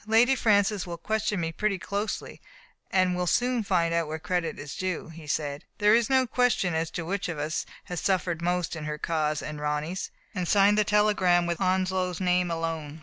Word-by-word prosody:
"Lady 235 +4 +5
Francis 205 -4 +2
will 170 -1 -5
question 215 +2 -1
me 165 -1 -1
pretty 210 +3 0
closely, 200 +3 -4 0.5
and 185 -1 +2
will 180 0 -1
soon 245 +4 +2
find 175 -5 +1
out 170 -1 +1
where 155 +1 -3
credit 175 -1 -2
is 145 -1 -7
due," 185 -3 -3
he 165 -1 -11
said. 145 -1 -2
"There 210 0 +4
is 230 -1 +3
no 260 -1 +4
question 240 -7 +1
as 160 0 -1
to 165 - -3
which 195 +1 -2
of 170 - -4
us 150 +2 -2 0.2
has 180 -2 -5
suffered 175 -3 0
most 175 0 -1
in 155 -1 -6
her 150 0 -3
cause 155 -1 -1
and 150 -1 -6
Ronny*s." 150 +5 -2 0.2
And 180 -4 -2
he - - +1
signed 205 +1 +5
the - - +5
telegram 205 -4 +3
with 170 +2 -2
Onslow's 185 -1 0
name 180 -1 +2
alone. 165 -2 -3
180 Hz, 205 wpm, -27 LUFS, 165-205 Hz, 0.5 s, Lady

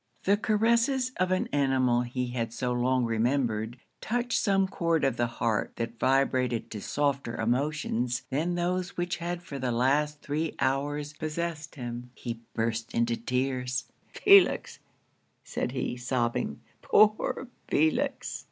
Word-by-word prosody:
The 200 - +4
caresses 235 +5 +2
of 185 0 +1
an 185 - +1
animal 130 -4 +3
he 125 0 -3
had 115 -2 -2
so 125 0 -1
long 125 +1 +2
remembered, 115 -1 0 0.2
touched 245 +2 0
some 195 -2 +2
chord 165 -4 0
of 135 -3 +2
the 120 0 +1
heart 115 -2 -1
that 115 0 -4
vibrated 130 -3 +1
to 105 - -5
softer 140 -4 -1
emotions 125 0 0
than 165 +6 0
those 180 +1 -1
which 175 0 -1
had 175 +1 -4
for 140 -5 -7
the 125 -1 -1
last 145 +5 +1
three 155 +2 -2
hours 145 +2 -1
possessed 160 +1 -4
him 120 -2 -6
he 115 -2 -5 0.2
burst 115 +1 -2
into 115 0 +2
tears. 125 +1 -1 0.3
'Felix!' 395 -1 +5 0.6
said 125 - -3
he, 125 -1 -2
sobbing, 125 -1 -1 0.2
'poor 215 +4 +3 0.2
Felix!' 155 +1 +1
135 Hz, 135 wpm, -28 LUFS, 120-170 Hz, 0.6 s, Felix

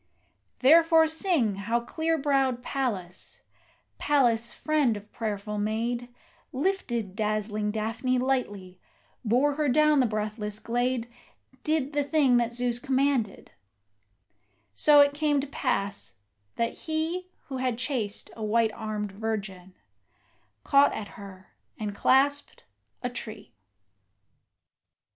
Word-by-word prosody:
Therefore 325 +4 +6
sing 315 - +1
how 230 +4 0
clear 320 +6 -1
browed 270 -4 +1
Pallas 205 -11 -4 0.6
Pallas, 240 -6 +2
friend 295 -8 +1
of 205 +1 -13
prayerful 210 -2 -4
maid, 235 +3 -2 0.4
Lifted 255 - -2
dazzling 215 -1 -1
Daphne 225 +4 -1
lightly, 205 -8 -2 0.4
bore 255 +6 +2
her 300 -2 +1
down 305 +2 +4
the 255 - +4
breathless 210 -1 -3
glade, 240 +2 -1 0.6
Did 305 -2 0
the 290 0 +1
thing 280 -4 +3
that 235 -1 +1
Zeus 245 0 -1
commanded: 265 -5 0 1.2
so 290 - +6
it 285 0 +4
came 295 -1 +1
to 275 - -2
pass 200 - -2 0.4
that 230 0 -1
he 330 +3 -3 0.2
Who 265 - -4
had 255 -2 -1
chased 245 -6 -3
a 220 - -6
white 220 +1 +2
armed 210 -2 -4
virgin, 195 -3 -5 0.9
caught 280 0 +5
at 205 - -5
her, 190 -2 -12 0.3
and 210 -2 -4
clasped 280 +6 +2 0.4
a 245 - 0
tree. 215 - -8
240 Hz, 115 wpm, -27 LUFS, 215-285 Hz, 1.2 s, Therefore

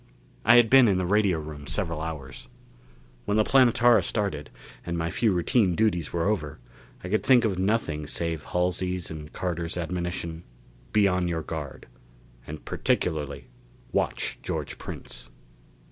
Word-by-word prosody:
I 120 - +7
had 120 -1 +7
been 130 0 +7
in 95 -3 +3
the 90 - 0
radio 100 -2 +2
room 75 -2 -8
several 85 -6 -1
hours. 75 -4 -7 0.8
When 105 - +1
the 110 - +5
Planetara 120 -3 +5
started, 90 -6 -2 0.3
and 85 0 -3
my 85 +1 -2
few 115 -3 +2
routine 95 +1 +2
duties 90 -7 +1
were 85 -1 -1
over, 75 -9 -1 0.5
I 90 - -5
could 110 +2 +1
think 125 -3 +5
of 95 -4 -1
nothing 95 -7 0
save 80 -1 -3
Halsey's 90 0 -1
and 75 -1 -8
Carter's 85 -2 -3
admonition: 85 -1 -3 0.5
"Be 105 -2 +4
on 90 -2 +1
your 80 -2 -2
guard. 75 -5 -6 0.6
And 75 0 -8
particularly 75 -5 -1 0.5
watch - - -1
George - - -4
Prince." - - -8
90 Hz, 145 wpm, -26 LUFS, 80-105 Hz, 0.8 s, I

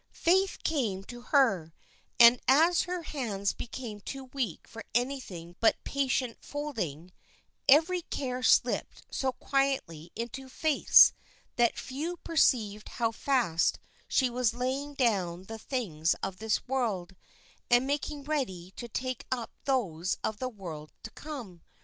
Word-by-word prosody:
Faith 380 +3 +3
came 225 -12 0
to 240 +4 -10
her, 225 - +2 0.4
and 235 +1 +8
as 325 +6 +5
her 360 -1 -3
hands 215 -10 -2
became 235 -3 -7
too 270 +6 -7
weak 245 - -3
for 225 0 -9
anything 235 -10 -2
but 225 - +3
patient 265 -3 -1
folding, 195 - -4 0.6
every 330 +6 +5
care 255 -5 -4
slipped - - +2
so 265 -1 0
quietly 265 - -1
into 245 +4 -6
Faith's, 310 +2 +6 0.4
that 240 -1 +2
few 315 +7 -4
perceived 220 -11 +1
how 230 -2 +1
fast 230 - +1 0.3
she 260 - +3
was 240 -2 0
laying 270 +4 -2
down 190 -9 0
the 225 +3 -8
things 180 - -1
of 190 -1 -3
this 220 +1 -1
world, 210 -9 -1 0.5
and 245 +1 +5
making 285 +1 -2
ready 235 - -3
to 240 - -6
take 255 +1 -4
up 245 -3 -2
those 190 - 0
of 215 - -2
the 255 - -2
world 165 -9 -8
to 220 - -8
come. 240 - -8
245 Hz, 135 wpm, -29 LUFS, 195-275 Hz, 0.6 s, and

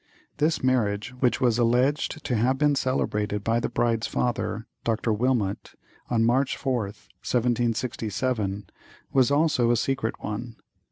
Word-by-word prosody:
This 155 0 +1
marriage, 115 -4 +1
which 125 -2 +2
was 120 -2 +2
alleged 130 +6 +1
to - - -1
have 125 +4 +2
been 145 +1 +3
celebrated 105 -6 -1
by 115 +2 +1
the - - -2
bride's 115 -1 0
father, 115 -2 -2 0.2
Dr. 115 0 0
Wilmot, 110 -3 -1 0.3
on 115 -2 +2
March 130 +3 +2
4th, 120 -7 -3 0.2
1767, 115 -3 -1 0.5
was 130 -2 +4
also 145 -5 +3
a 120 - +3
secret 125 -2 -1
one. 115 +2 -5
120 Hz, 130 wpm, -26 LUFS, 110-130 Hz, 0.5 s, was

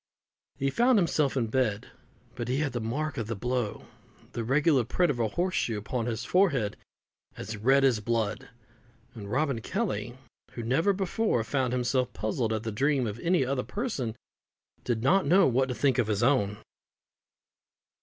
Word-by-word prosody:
He 135 0 0
found 240 - +4
himself 155 -7 +1
in 120 - +1
bed, 110 -3 -1 0.4
but 120 -2 -5
he 125 +2 0
had 145 -2 -1
the 120 - -2
mark 140 +5 -2
of 110 - -3
the 115 - -3
blow, 120 +1 -2 0.5
the 120 - -4
regular 140 +2 +3
print 175 +8 +1
of 125 - -5
a 115 - +2
horse 180 - -1
shoe, 115 -10 0
upon 115 +3 -3
his 115 +1 -3
forehead 140 - +2 0.6
as 110 - -5
red 135 +6 +3
as 130 -5 +3
blood; 110 -1 -2 0.6
and 105 -4 -8
Robin 135 -3 0
Kelly, 125 - -3 0.4
who 120 - -5
never 135 - +2
before 195 - 0
found 130 0 -1
himself 125 0 0
puzzled 110 +2 -1
at 110 -1 -2
the 110 - -3
dream 135 +4 +1
of 110 0 -4
any 170 -3 +2
other 130 0 -1
person, 135 - -3 0.7
did 115 -2 -1
not 185 +5 +3
know 185 +4 +6
what 130 +1 +2
to 125 - -2
think 135 -1 +2
of 120 - +2
his 105 +1 0
own. 110 -6 +2
125 Hz, 175 wpm, -28 LUFS, 115-145 Hz, 0.7 s, know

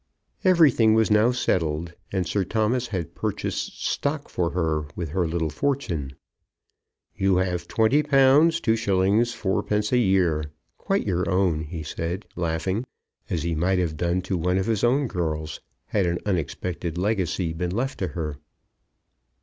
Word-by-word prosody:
Everything 145 - +5
was 110 -1 +3
now 105 +3 +5
settled, 85 -9 -1 0.2
and 95 -2 0
Sir 100 +3 0
Thomas 110 +5 0
had 90 -8 -4
purchased - - -3
stock 145 0 -1
for 85 -2 0
her 80 -4 -1
with 85 -3 -4
her 90 +2 0
little 80 -1 -1
fortune. 85 - -2 1.0
"You 95 -1 +2
have 90 -2 -1
£20 135 +7 +2
2_s._ 145 +4 +5 0.3
4_d._ 105 +1 +1
a 125 - +4
year, 90 -8 +2 0.3
quite - - 0
your 90 +1 0
own," 90 -4 +2
he 80 +1 -6
said, 85 +5 -4
laughing; 85 +5 -1 0.5
as 80 - -1
he 85 0 -1
might 90 +4 +1
have 85 -4 0
done 85 +3 0
to 95 -2 -2
one 90 +2 +1
of 95 - 0
his 110 -3 0
own 135 +4 +3
girls, 80 - -3 0.3
had 100 -4 0
an 85 0 0
unexpected 85 -2 -2
legacy 90 -4 0
been 90 +2 -2
left 125 +9 -2
to 95 - -1
her. 75 -4 -4
95 Hz, 150 wpm, -25 LUFS, 85-110 Hz, 1.0 s, Everything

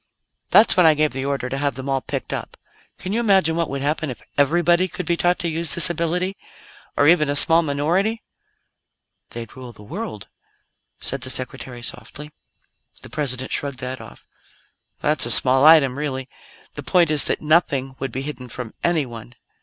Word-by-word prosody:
"That's 220 - +6
when 180 -3 +5
I 155 - +5
gave 150 -1 0
the 135 +1 -4
order 140 -2 -2
to 135 +2 -4
have 140 -3 -1
them 130 +1 -6
all 135 -1 -1
picked - - -5
up. - - -7 0.4
Can 185 +2 -6
you 230 - 0
imagine 190 -8 +2
what 170 -1 -2
would 140 0 -5
happen 155 +1 -2
if 125 - -9
everybody 175 +5 +2
could 180 0 -7
be 170 - 0
taught 175 +1 +1
to 175 - -4
use 165 -1 +2
this 175 +1 +7
ability? 175 +3 -2 0.6
Or 145 - +3
even 155 -3 +4
a 145 - -1
small 165 +3 +6
minority?" 170 +9 -1 1.1
"They'd 115 -1 -9
rule 125 -2 -10
the 105 - -15
world," 105 0 -7 0.7
said 135 0 -1
the 130 - -6
Secretary 125 -1 -3
softly. 150 +4 -8 0.7
The - - -12
President 130 -4 -2
shrugged 140 -2 -3
that 130 -1 -6
off. 110 - -14 0.8
"That's 150 -5 +1
a - - -2
small 130 +3 +5
item, 155 -5 +6
really. 135 -3 -4 0.5
The - - -7
point 175 -4 +2
is 150 -2 +4
that - - -1
nothing 145 -4 +1
would 135 - -4
be 130 +3 -5
hidden 135 -3 -7
from 120 -3 -8
anyone. 125 -8 -3
145 Hz, 185 wpm, -21 LUFS, 130-170 Hz, 1.1 s, this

